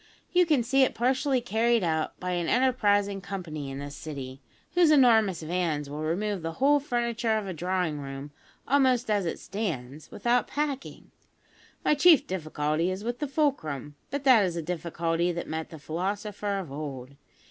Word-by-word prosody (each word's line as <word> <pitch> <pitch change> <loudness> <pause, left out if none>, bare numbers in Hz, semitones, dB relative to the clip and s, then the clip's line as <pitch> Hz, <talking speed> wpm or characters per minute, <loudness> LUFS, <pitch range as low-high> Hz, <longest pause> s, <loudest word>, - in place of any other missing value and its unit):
You 360 -1 +4
can 295 -7 +3
see 270 +4 +2
it 260 - +3
partially 260 +2 +1
carried 235 -1 +2
out 160 -2 -1
by 180 0 -3
an 175 -2 -1
enterprising 205 -6 +2
company 160 -8 -5
in 135 - -6
this 140 +1 -7
city, 135 -3 -7 0.3
whose 350 -2 +5
enormous 225 - +4
vans 155 -4 -1
will 150 +1 -5
remove 190 +5 -1
the 165 0 -4
whole 285 - +4
furniture 235 -4 0
of 215 - -3
a 190 - -4
drawing 175 -2 -1
room, 135 +1 -7 0.4
almost 260 -4 +3
as 200 -4 +1
it - - -2
stands, 155 - -5
without 240 +3 +1
packing. 285 -2 -4 0.7
My - - +5
chief 315 0 +6
difficulty 155 -1 -1
is 190 +2 -4
with 240 +1 -3
the 295 - -2
fulcrum; 210 - -1 0.2
but 280 +1 -3
that 255 -6 +6
is 180 -3 -1
a 170 - -3
difficulty 170 0 -1
that 170 - -5
met 160 0 -4
the 160 - -9
philosopher 200 +6 -3
of 180 -8 -6
old. 140 -3 -6
190 Hz, 170 wpm, -27 LUFS, 155-245 Hz, 0.7 s, chief